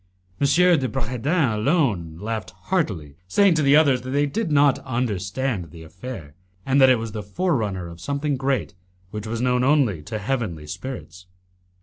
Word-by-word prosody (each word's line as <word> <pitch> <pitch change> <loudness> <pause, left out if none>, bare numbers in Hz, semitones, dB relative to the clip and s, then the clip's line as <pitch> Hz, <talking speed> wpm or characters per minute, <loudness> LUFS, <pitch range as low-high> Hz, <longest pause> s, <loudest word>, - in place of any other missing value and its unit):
M. 140 - +3
de 170 -6 +4
Bragadin 130 +3 0
alone 105 - +1
laughed 110 -1 -4
heartily, 95 - -3
saying 195 - +4
to 155 - +1
the 140 0 +5
others 140 -5 +4
that 130 - -7
they 145 +2 +2
did 165 +4 -2
not 145 -2 +4
understand 115 - -2
the 80 +1 -12
affair, 95 - -9 0.3
and 135 +1 +3
that 130 - +8
it 130 - +5
was 115 -1 -5
the 105 - -5
forerunner 105 - -1
of 85 0 -11
something 140 +4 -1
great 135 -4 -1 0.4
which 105 0 -5
was 115 +1 -3
known 125 0 +2
only 130 - +2
to 110 +8 -5
heavenly 105 - -3
spirits. 90 - -8
125 Hz, 170 wpm, -23 LUFS, 100-140 Hz, 0.4 s, that